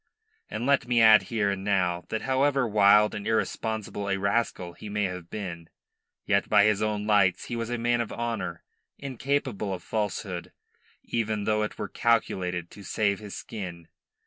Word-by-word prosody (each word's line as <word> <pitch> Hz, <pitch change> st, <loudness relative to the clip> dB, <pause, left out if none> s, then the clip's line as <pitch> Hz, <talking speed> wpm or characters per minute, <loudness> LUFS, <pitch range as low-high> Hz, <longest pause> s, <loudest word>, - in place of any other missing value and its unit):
And 110 Hz, +3 st, -3 dB
let 140 Hz, -2 st, +2 dB
me 120 Hz, -1 st, +3 dB
add 110 Hz, -1 st, +8 dB
here 110 Hz, -4 st, +1 dB
and 95 Hz, -1 st, -4 dB
now 90 Hz, -4 st, 0 dB
that 110 Hz, -, -3 dB
however 135 Hz, -1 st, +2 dB
wild 105 Hz, 0 st, +5 dB
and 100 Hz, -, -5 dB
irresponsible 110 Hz, -2 st, -2 dB
a 95 Hz, -, +1 dB
rascal 100 Hz, -3 st, -1 dB
he 105 Hz, -, -9 dB
may 105 Hz, 0 st, -1 dB
have 90 Hz, -3 st, -4 dB
been, 85 Hz, -6 st, -6 dB, 0.6 s
yet -, -, +1 dB
by 100 Hz, -, +6 dB
his 105 Hz, -1 st, +3 dB
own 105 Hz, -1 st, -1 dB
lights 100 Hz, -4 st, +3 dB
he 120 Hz, -, -4 dB
was 115 Hz, 0 st, -3 dB
a 120 Hz, -, -1 dB
man 120 Hz, 0 st, +1 dB
of 115 Hz, -, -4 dB
honour, 115 Hz, -8 st, -3 dB, 0.3 s
incapable 130 Hz, -6 st, -2 dB
of 95 Hz, -, -5 dB
falsehood, 100 Hz, -4 st, -3 dB, 0.5 s
even 110 Hz, -2 st, -1 dB
though 105 Hz, +1 st, +1 dB
it 105 Hz, -, -3 dB
were 105 Hz, -, -3 dB
calculated 90 Hz, -8 st, 0 dB
to 105 Hz, -, -12 dB
save 100 Hz, 0 st, 0 dB
his 105 Hz, -2 st, -8 dB
skin. 90 Hz, -6 st, -7 dB
105 Hz, 170 wpm, -27 LUFS, 95-115 Hz, 0.6 s, add